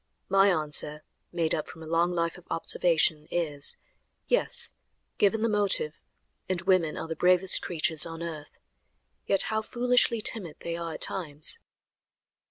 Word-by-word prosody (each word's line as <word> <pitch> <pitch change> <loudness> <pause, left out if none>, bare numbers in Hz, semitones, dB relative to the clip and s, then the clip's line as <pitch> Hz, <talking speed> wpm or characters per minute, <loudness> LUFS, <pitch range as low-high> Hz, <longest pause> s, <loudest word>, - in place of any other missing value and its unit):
My 195 +1 +5
answer, 150 -2 -1 0.3
made 165 -2 +1
up 155 - -2
from 160 - -11
a - - -9
long 165 +2 +1
life 170 -1 -1
of 180 - -15
observation, 160 -2 +2
is: 150 -5 0 0.5
"Yes! - - +3 0.5
Given 215 +2 +2
the - - +3
motive, 200 -8 0 0.5
and 185 -2 0
women 180 -4 +2
are - - -5
the 160 - -4
bravest 180 +2 +3
creatures 160 -2 0
on 165 0 -4
earth." 155 -3 -8 0.7
Yet 195 - +4
how 220 - +1
foolishly 245 0 +1
timid 185 -9 -2
they 170 0 -4
are 170 -1 -5
at - - -10
times! 155 -5 -1
170 Hz, 150 wpm, -27 LUFS, 160-190 Hz, 0.7 s, My